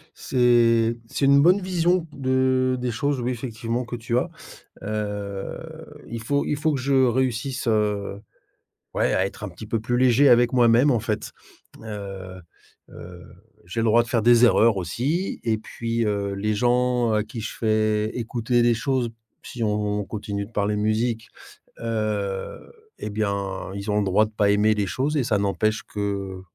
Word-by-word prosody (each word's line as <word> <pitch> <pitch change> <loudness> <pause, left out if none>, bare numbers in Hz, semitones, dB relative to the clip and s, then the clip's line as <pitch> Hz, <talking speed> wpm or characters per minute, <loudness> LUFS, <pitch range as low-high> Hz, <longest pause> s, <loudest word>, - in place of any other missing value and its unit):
C'est 120 -2 +3
c'est 140 - -1
une 140 +1 +6
bonne 180 +6 +5
vision 175 -1 +1
de 130 -1 +1
des 125 0 -2
choses, 140 +4 -1
oui, 125 +2 -1
effectivement 120 0 -3
que 120 - -5
tu 120 +1 -2
as, - - 0 0.5
heu, 105 -2 -4 0.5
il 115 -1 -5
faut 140 +5 0
il 150 - 0
faut 155 0 +1
que 135 - -1
je 130 0 +3
réussisse, 125 +1 -1
heu, 105 -2 0 0.7
ouais - - +1
à 95 - +2
être 105 - -8
un - - -4
petit 95 +5 -10
peu 115 0 -1
plus 120 +2 -1
léger 130 +2 +5
avec 120 -1 +5
moi-même 120 +2 +5
en 120 -4 +2
fait. 105 -1 -3 0.5
Heu 95 -3 -7 0.5
heu, 90 0 -11 0.4
j'ai 115 +6 -3
le - - +1
droit 115 +1 +5
de 115 - -9
faire 115 -3 +1
des 120 +1 +6
erreurs 115 -2 +4
aussi 135 - -2
et 110 -2 +1
puis, 115 +1 -3
heu, 100 -1 -1
les 105 +2 -1
gens 125 +1 +2
à 105 0 +2
qui 110 +2 -7
je 110 - -5
fais 110 -1 +1
écouter 120 +1 0
des 120 0 +4
choses, 125 -1 -1 0.3
si 120 - -7
on 105 -1 -1
continue 100 -1 -5
de - - -19
parler 105 -1 0
musique, 110 +2 -1 0.5
heu, 105 -4 -2 0.4
et - - -5
bien, 100 -2 -3
ils 100 +1 -4
ont 105 - +2
le 105 - +1
droit 100 +3 +4
de 110 - -12
pas 105 -1 +1
aimer 105 +1 +3
les 105 -2 -1
choses 135 +7 -1
et - - +2
ça 110 -3 +1
n'empêche 105 +2 0
que, 100 -2 -4
115 Hz, 175 wpm, -24 LUFS, 105-125 Hz, 0.7 s, une